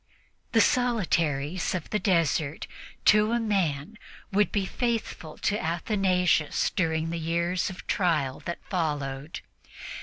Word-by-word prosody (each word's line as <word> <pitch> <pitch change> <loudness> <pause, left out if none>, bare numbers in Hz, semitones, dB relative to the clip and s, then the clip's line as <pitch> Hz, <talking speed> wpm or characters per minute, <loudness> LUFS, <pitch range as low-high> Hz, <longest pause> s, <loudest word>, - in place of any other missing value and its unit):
The 225 - +6
solitaries 175 - +1
of 175 - -5
the 210 - +1
desert, 165 -5 +1 0.4
to 215 +2 +5
a 235 - +2
man, 195 -4 -1 0.3
would 205 +1 +2
be 200 -2 0
faithful 225 -8 -3
to 210 +1 0
Athanasius 180 -1 +1
during 165 -3 0
the 170 - -3
years 170 +2 0
of 185 - -9
trial 155 -8 0
that 170 - -5
followed. 145 -4 -3
175 Hz, 120 wpm, -27 LUFS, 160-205 Hz, 0.4 s, The